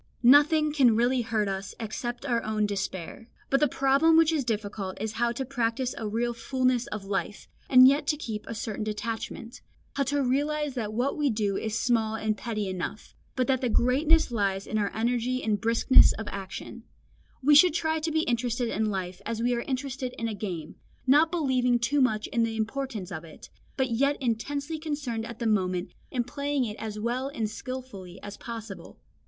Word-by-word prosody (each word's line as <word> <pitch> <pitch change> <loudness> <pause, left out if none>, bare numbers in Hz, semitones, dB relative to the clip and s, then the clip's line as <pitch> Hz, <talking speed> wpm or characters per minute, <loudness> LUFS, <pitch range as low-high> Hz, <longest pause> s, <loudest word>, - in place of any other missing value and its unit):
Nothing 295 +4 +6
can 255 -7 +5
really 245 +2 +2
hurt 220 -3 0
us 195 0 -4
except 240 +3 -4
our 235 -4 +1
own 215 -1 0
despair. 195 +1 -4 0.2
But 275 - +4
the 300 - +4
problem 280 +5 +3
which 325 0 +5
is 305 -4 0
difficult 205 -4 -3
is 220 - -2
how 235 +2 0
to 265 +2 -3
practise 245 0 -1
a 220 - -4
real 235 +3 -1
fulness 255 +1 0
of 210 -2 -6
life, 200 +1 -3 0.2
and 255 -1 +9
yet 285 +2 +2
to 300 - +1
keep 220 -7 -6
a 230 - -5
certain 220 -1 -4
detachment, 225 +2 -5 0.3
how - - -2
to 285 +1 0
realise 290 +3 0
that 225 -5 -3
what 245 +6 -1
we 290 -2 +2
do 210 -4 0
is 220 +1 -2
small 225 -2 +1
and 220 -1 -1
petty 215 -3 -3
enough, 185 +3 -5 0.2
but 255 - +1
that 260 -1 +1
the 250 - 0
greatness 280 +7 +3
lies 195 -3 0
in 215 - -1
our 205 -1 0
energy 245 +3 0
and 210 -3 0
briskness 230 +4 +6
of 220 - -6
action; 195 +4 -7 0.6
we 295 +3 +5
should 315 +2 +7
try 320 -1 0
to 320 +1 -2
be 315 0 +2
interested 240 -1 -1
in 220 -1 0
life 185 -1 -4
as 225 +1 -3
we 245 +1 +2
are 235 - -1
interested 260 -1 -4
in 230 - -2
a 220 - -3
game, 180 -7 -5 0.3
not 295 +5 +5
believing 260 -7 +2
too 250 +5 +1
much 215 -4 +2
in 235 - +2
the 225 -1 0
importance 225 -3 -3
of 160 -3 -5
it, 160 -2 -13 0.3
but 260 -2 0
yet 275 +5 +2
intensely 280 +6 -2
concerned 285 -8 -3
at 235 - -8
the 235 - -4
moment 185 -4 0 0.2
in 250 -3 -1
playing 280 +1 -1
it 210 -2 -5
as 215 -1 -5
well 240 +5 -1
and 225 -6 -3
skilfully 225 -8 -7
as 205 0 -7
possible. 225 -4 -8
235 Hz, 195 wpm, -27 LUFS, 215-270 Hz, 0.6 s, and